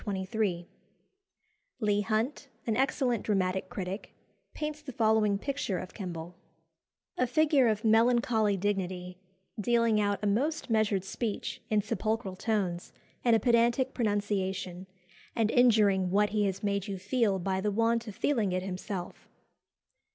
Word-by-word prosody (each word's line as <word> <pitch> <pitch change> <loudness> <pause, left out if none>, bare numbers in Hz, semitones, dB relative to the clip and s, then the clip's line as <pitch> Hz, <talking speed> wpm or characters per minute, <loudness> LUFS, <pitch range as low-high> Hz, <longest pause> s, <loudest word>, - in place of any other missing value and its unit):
Leigh 205 -3 +2
Hunt, 225 +7 -1 0.2
an 225 - 0
excellent 255 -3 +1
dramatic 190 -2 0
critic, 190 +2 -6 0.4
paints 300 0 -4
the 295 -3 -8
following 220 -3 +2
picture 265 -5 -2
of 185 - -7
Kemble: 175 -4 -6 0.9
"A 250 - +3
figure 290 0 +3
of 215 0 0
melancholy 225 -2 +3
dignity, 185 -2 -3 0.4
dealing 230 0 +2
out 205 -1 +1
a - - +1
most 265 +7 0
measured 215 -4 +2
speech 210 +2 -4
in 210 -2 +2
sepulchral 215 -2 -2
tones 190 -4 -2 0.3
and 235 -2 +5
a - - +3
pedantic 240 +3 +2
pronunciation, 195 -4 -2 0.5
and 225 -2 +2
injuring 210 -6 +4
what 205 +3 +3
he 210 0 +1
has 195 0 -2
made 200 0 -1
you 195 -1 -4
feel 205 +1 +1
by 190 +1 -1
the 210 - 0
want 230 +2 +1
of 210 - -7
feeling 225 -8 +1
it 185 0 -1
himself." 185 -1 -6
210 Hz, 135 wpm, -30 LUFS, 195-235 Hz, 0.9 s, and